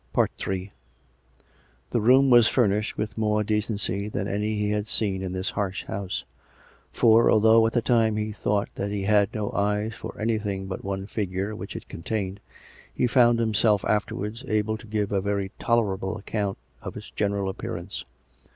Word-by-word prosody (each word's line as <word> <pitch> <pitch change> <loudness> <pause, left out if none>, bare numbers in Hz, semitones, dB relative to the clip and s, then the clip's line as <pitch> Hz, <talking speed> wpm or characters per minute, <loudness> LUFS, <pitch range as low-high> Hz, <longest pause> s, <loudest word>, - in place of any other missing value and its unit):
Ill - - +2 1.6
The 120 - +1
room 130 +4 +5
was 120 -2 +7
furnished 105 -4 +1
with 105 0 -3
more 105 -1 +2
decency 105 -2 -1
than 100 -2 -2
any 105 +2 -1
he 105 0 0
had 105 0 -1
seen 100 -4 +1
in 95 -1 -3
this 95 +1 -2
harsh 100 -1 -2
house; 95 -1 -4 0.7
for, 115 0 +5
although 110 +1 +6
at 115 - -3
the 120 - +1
time 115 -3 +3
he 110 0 -2
thought 105 -1 -1
that 100 - -3
he 100 -1 -2
had 100 -1 +3
no 105 -2 -2
eyes 105 +2 0
for - - -8
anything 105 -3 -1
but 95 -1 -6
one 95 0 -3
figure 100 0 -3
which - - -7
it - - -7
contained, 100 +2 -4 0.5
he - - 0
found 120 -1 +5
himself 110 -2 +2
afterwards 105 +2 -1
able 110 -1 +1
to 110 +1 -11
give 105 -1 -1
a 100 -2 +1
very 100 -1 -1
tolerable 105 -3 0
account 100 -1 -3 0.2
of - - -7
its - - -10
general 100 -1 -1
appearance. 95 -1 -5
105 Hz, 170 wpm, -26 LUFS, 100-110 Hz, 1.6 s, was